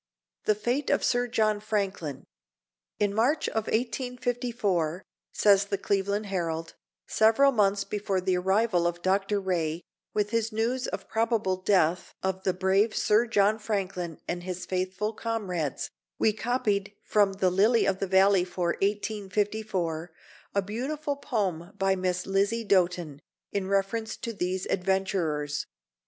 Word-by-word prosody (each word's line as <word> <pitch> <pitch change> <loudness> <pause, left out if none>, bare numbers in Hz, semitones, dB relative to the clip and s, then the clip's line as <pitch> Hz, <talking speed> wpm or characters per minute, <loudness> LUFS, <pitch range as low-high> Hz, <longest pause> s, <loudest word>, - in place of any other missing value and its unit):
THE 215 - +3
FATE 240 +7 -1
OF 285 - +2
SIR 245 -1 +2
JOHN 215 -3 +1
FRANKLIN. 200 -9 -2 0.7
"In 205 -1 +1
March, 245 +9 +2
of 220 -1 -2
1854, 240 - -1 0.3
says 200 -1 +4
the 200 0 -2
Cleveland 200 +2 0
Herald, 165 -4 -3 0.3
several 225 +6 +4
months 200 -4 +2
before 200 -2 -1
the 185 0 +1
arrival 190 0 +2
of 175 0 -4
Dr. 195 +2 +1
Rae, 170 -3 -1 0.3
with 210 0 0
his 230 0 0
news 235 +4 0
of - - -4
the - - -22
probable 225 -4 +1
death 185 -2 +1
of 190 0 -1
the 190 - +1
brave 190 +4 +2
Sir 215 +3 +3
John 210 0 +3
Franklin 190 -6 -3
and 175 0 -2
his 185 0 -5
faithful 190 +3 -2
comrades, 195 - -3 0.3
we 215 - +3
copied 210 -3 -1
from 205 -2 +3
the 190 -1 +1
Lily 215 +6 +4
of 195 -1 +1
the 195 - -1
Valley 190 0 +5
for 180 -1 -2
1854, 200 -4 -1 0.5
a 200 - +3
beautiful 280 +8 -3
poem 195 - -2
by 195 0 +2
Miss 180 -1 -1
Lizzie 200 +4 +1
Doten, 180 -6 +1 0.3
in 195 -2 -2
reference 200 +3 -1
to 235 -2 -5
these 185 -1 -2
adventurers. 180 -6 -1
200 Hz, 140 wpm, -28 LUFS, 185-220 Hz, 0.7 s, Valley